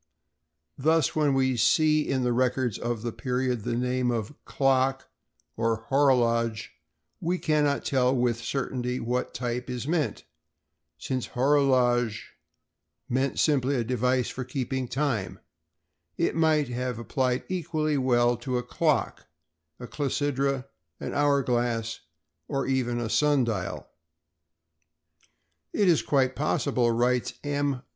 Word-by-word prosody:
Thus, 160 +1 +2
when 150 -3 +2
we 130 -1 +2
see 155 +7 +4
in 130 -1 0
the 125 -1 +1
records 125 -1 0
of 120 -2 -3
the 120 - -2
period 125 +1 -2
the 120 +2 -2
name 125 +1 0
of 115 +1 -2
"clock" 135 -1 +1 0.5
or 115 -1 -1
"horologe" 115 -5 +2 0.5
we 175 +2 -1
cannot 150 -4 +1
tell 130 -2 +2
with 120 -2 +1
certainty 125 -2 -2
what 125 +2 -2
type 125 0 -3
is 125 +1 -4
meant, 155 -9 -1 0.7
since 130 -2 -3
"horologe" 125 -4 +2 0.9
meant 130 +2 0
simply 140 -2 +2
a 120 - 0
device 125 +1 0
for 130 - -5
keeping 130 0 -3
time; 125 -6 -2 0.8
it - - +1
might 155 -3 +2
have 125 0 -3
been 115 - -7
applied 130 -1 0
equally 155 -4 -1
well 120 -2 +3
to 125 +1 -2
a 125 - -2
clock, 125 - -1 0.5
clepsydra, 140 0 -1 0.3
an - - -5
hour 145 -1 +2
glass, 120 -2 -1 0.5
or 135 -2 -1
even 125 -2 0
a 120 - -2
sun 145 +3 +3
dial. 105 -6 -3 1.9
"It 205 - +2
is 170 -4 +4
quite 130 -2 +1
possible," 135 -4 +1
writes 120 +1 +1
M. 145 -2 -1
130 Hz, 125 wpm, -27 LUFS, 120-140 Hz, 1.9 s, see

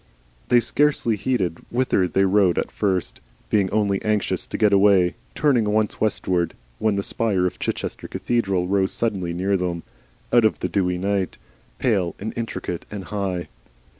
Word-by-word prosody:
They 120 - +5
scarcely 140 -3 +1
heeded 95 -6 -1
whither 120 -7 +1
they 95 +2 +2
rode 95 -2 +3
at - - -1
first, 95 -3 -1 0.3
being 100 -3 +3
only 100 -2 +1
anxious 105 -2 -1
to - - -4
get 105 -2 +3
away, 100 -3 +5 0.2
turning 130 -7 +3
once 105 0 0
westward 90 -5 0 0.2
when 110 -2 +1
the 100 - -1
spire 100 -5 0
of 90 - -2
Chichester - - -3
cathedral 95 -7 0
rose 95 0 +1
suddenly 95 -7 -1
near 95 +3 0
them 90 -2 -2 0.5
out 120 -1 +6
of 110 - +3
the - - -2
dewy 90 -2 0
night, 95 0 -1 0.4
pale 100 -8 +1
and 110 +3 -5
intricate 115 -7 -4
and 100 -2 -6
high. 95 -5 -2
100 Hz, 160 wpm, -23 LUFS, 90-110 Hz, 0.5 s, out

